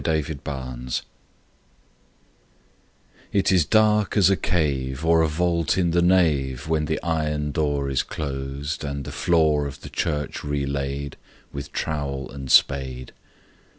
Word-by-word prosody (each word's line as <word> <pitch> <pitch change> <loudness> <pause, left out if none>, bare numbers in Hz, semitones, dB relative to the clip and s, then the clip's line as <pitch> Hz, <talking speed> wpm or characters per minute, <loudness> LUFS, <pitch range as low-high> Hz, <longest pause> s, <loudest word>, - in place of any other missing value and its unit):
THE 80 -2 +1
CLOCK 75 -2 -8
WINDER 65 -2 -5 2.4
IT 100 -1 +2
is 90 -5 +4
dark 105 0 +3
as 100 -1 +6
a - - +4
cave, 70 -6 -1
Or 80 0 +5
a 80 - +3
vault 85 +2 +1
in 90 -2 +2
the 85 +1 +3
nave 75 -8 +2
When 80 -1 +1
the 80 - -1
iron 75 -3 -1
door 70 -3 0
Is 65 -1 +1
closed, 70 0 -4
and 70 -1 -4
the - - -6
floor 75 -4 +2
Of 70 - -9
the - - -9
church 75 -4 -2
relaid 70 -1 -3 0.4
With 70 0 -6
trowel 70 -4 -3
and 70 -1 -7
spade. 65 -2 +3
75 Hz, 140 wpm, -24 LUFS, 70-80 Hz, 2.4 s, as